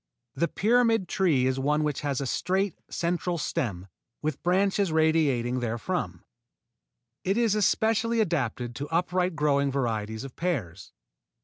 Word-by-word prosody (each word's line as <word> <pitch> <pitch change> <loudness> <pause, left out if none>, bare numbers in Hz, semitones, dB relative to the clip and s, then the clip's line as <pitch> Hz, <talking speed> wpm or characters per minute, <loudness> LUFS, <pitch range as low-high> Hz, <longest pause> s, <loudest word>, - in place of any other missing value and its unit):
The 170 - 0
pyramid 225 -1 +2
tree 165 -10 +2
is 130 0 0
one 150 +3 +1
which 150 -2 -1
has 140 -3 -1
a 140 - -2
straight 190 +8 0 0.2
central 175 +1 -1
stem 100 - -2 0.3
with 150 -2 -3
branches 195 +1 +2
radiating 150 -6 +2
therefrom. 115 -1 -3 1.0
It 195 +3 0
is 230 -3 +3
especially 225 +2 +2
adapted 130 - -1
to 145 - -4
upright 180 +2 0
growing 140 -2 +2
varieties 110 -4 -2
of 135 -2 -9
pears. 110 - -3
155 Hz, 130 wpm, -27 LUFS, 130-185 Hz, 1.0 s, is